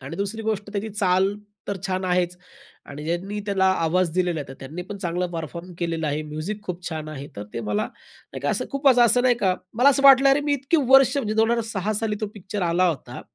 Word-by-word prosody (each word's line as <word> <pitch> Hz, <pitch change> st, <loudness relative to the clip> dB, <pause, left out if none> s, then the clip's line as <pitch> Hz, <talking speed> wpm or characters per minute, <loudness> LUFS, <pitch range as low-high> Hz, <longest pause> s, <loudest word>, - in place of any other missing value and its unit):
आणि 135 Hz, +1 st, -7 dB
दुसरी 200 Hz, +3 st, -3 dB
गोष्ट 210 Hz, -2 st, -2 dB
त्याची 210 Hz, +1 st, -3 dB
चाल 195 Hz, -1 st, +1 dB, 0.3 s
तर 200 Hz, -, -1 dB
छान 185 Hz, 0 st, -2 dB
आहेच 180 Hz, -1 st, 0 dB, 0.5 s
आणि 145 Hz, +1 st, -7 dB
ज्यांनी 185 Hz, +6 st, -3 dB
त्याला 195 Hz, -2 st, +1 dB, 0.2 s
आवाज 180 Hz, +1 st, +1 dB
दिलेला 180 Hz, -3 st, 0 dB
आहे, 145 Hz, -, -8 dB
तर 135 Hz, -, -8 dB
त्यांनी 155 Hz, +7 st, -6 dB
पण 200 Hz, +3 st, -8 dB
चांगला 180 Hz, -1 st, -2 dB
परफॉर्म 170 Hz, +2 st, -6 dB
केलेला 165 Hz, -2 st, -2 dB
आहे. 150 Hz, +1 st, -1 dB
म्युझिक 155 Hz, +8 st, -5 dB
खूप 180 Hz, -2 st, -5 dB
छान 155 Hz, -2 st, -5 dB
आहे, 140 Hz, -2 st, -7 dB
तर 100 Hz, -, -5 dB
ते 115 Hz, -, -2 dB
मला 105 Hz, -1 st, -1 dB
नाही 130 Hz, -, -14 dB
का 145 Hz, +2 st, 0 dB
असं 255 Hz, -, -1 dB
खूप 275 Hz, 0 st, +2 dB
असं 250 Hz, -2 st, +6 dB
असं 245 Hz, +1 st, +4 dB
नाही 250 Hz, -1 st, +4 dB
का, 185 Hz, -2 st, +2 dB, 0.2 s
मला 250 Hz, +5 st, +5 dB
असं 275 Hz, 0 st, +3 dB
वाटलं 275 Hz, 0 st, +8 dB
अरे, 275 Hz, +2 st, +4 dB
मी 290 Hz, 0 st, 0 dB
इतकी 280 Hz, +4 st, +1 dB
वर्ष 270 Hz, 0 st, +6 dB
म्हणजे 215 Hz, -6 st, -1 dB
2006 220 Hz, -2 st, 0 dB
साली 220 Hz, -2 st, -1 dB
तो 215 Hz, -, -1 dB
पिक्चर 205 Hz, 0 st, -5 dB
आला 180 Hz, +2 st, +3 dB
होता. 130 Hz, -6 st, -5 dB
190 Hz, 225 wpm, -24 LUFS, 165-220 Hz, 0.5 s, वाटलं